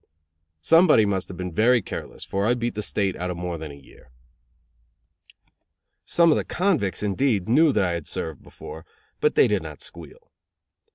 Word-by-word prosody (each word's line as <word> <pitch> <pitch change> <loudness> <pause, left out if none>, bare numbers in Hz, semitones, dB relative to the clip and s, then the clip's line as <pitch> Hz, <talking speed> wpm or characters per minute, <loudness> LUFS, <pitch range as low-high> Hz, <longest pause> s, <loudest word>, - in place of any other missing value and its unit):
Somebody 165 -9 +5
must 95 -2 -1
have 90 - -9
been 90 -1 -4
very 120 +8 +4
careless, 100 - -7
for 100 +2 -1
I 120 - +3
beat 120 0 -2
the 105 - -4
State 100 -2 -1
out 90 +1 -3
of 90 - -4
more 85 -1 -4
than 80 -1 -7
a 70 - -10
year. 70 -2 -18 2.0
Some 170 -1 +4
of - - +3
the - - -1
convicts, 170 - 0
indeed, 105 -1 0
knew 150 +7 +4
that 105 -7 +1
I 90 - 0
had 85 -3 -4
served 80 -4 -5
before; 80 - -11 0.4
but 450 0 +1
they - - +5
did - - 0
not - - -8
squeal. 485 -1 -12
100 Hz, 180 wpm, -24 LUFS, 90-135 Hz, 2.0 s, Somebody